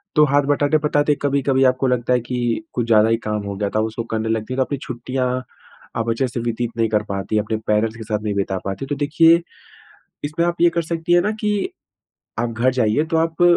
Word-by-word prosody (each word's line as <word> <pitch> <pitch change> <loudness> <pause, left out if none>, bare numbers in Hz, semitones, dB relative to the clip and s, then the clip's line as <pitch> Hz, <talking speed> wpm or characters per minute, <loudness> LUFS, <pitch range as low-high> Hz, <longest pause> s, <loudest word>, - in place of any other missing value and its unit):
तो 150 -1 +6
हाथ 145 0 +3
बटाते-बटाते, 145 0 +2
कभी-कभी 140 -1 +2
आपको 130 +1 -1
लगता 125 0 +1
है 125 - +3
कि, 120 +3 -2
कुछ 120 -2 -1
ज़्यादा 110 -1 +5
ही 115 - +3
काम 105 0 -1
हो 100 0 -4
गया 100 +1 -1
था, - - +3
उसको 115 +1 -4
करने 110 0 -1
लगती 110 +2 -2
हैं, - - -4
तो 135 - +2
आपकी 140 +2 -4
छुट्टियाँ, 125 +1 -2 0.5
आप 115 0 -1
अच्छे 120 +3 +1
से 120 0 -4
व्यतीत 120 0 -2
नहीं 115 -1 +2
कर 105 0 +1
पातीं, 100 +2 -1
अपने 110 +1 -2
पेरेंट्स 110 +1 +1
के 110 - -7
साथ 105 -1 -2
नहीं 105 -1 -1
बिता 95 -1 -1
पाती। 95 +7 -4
तो 145 - -2
देखिए, 165 +4 +4 0.8
इसमें 155 +3 0
आप 175 0 0
ये 175 - +7
कर 170 0 -1
सकती 165 +1 -1
हैं 175 - +6
ना 210 - 0
कि 210 -1 +1 0.9
आप 120 0 0
घर 120 +3 +2
जाइए 125 +3 +2
तो - - +3
आप, 165 +1 0
125 Hz, 225 wpm, -21 LUFS, 110-145 Hz, 0.9 s, ये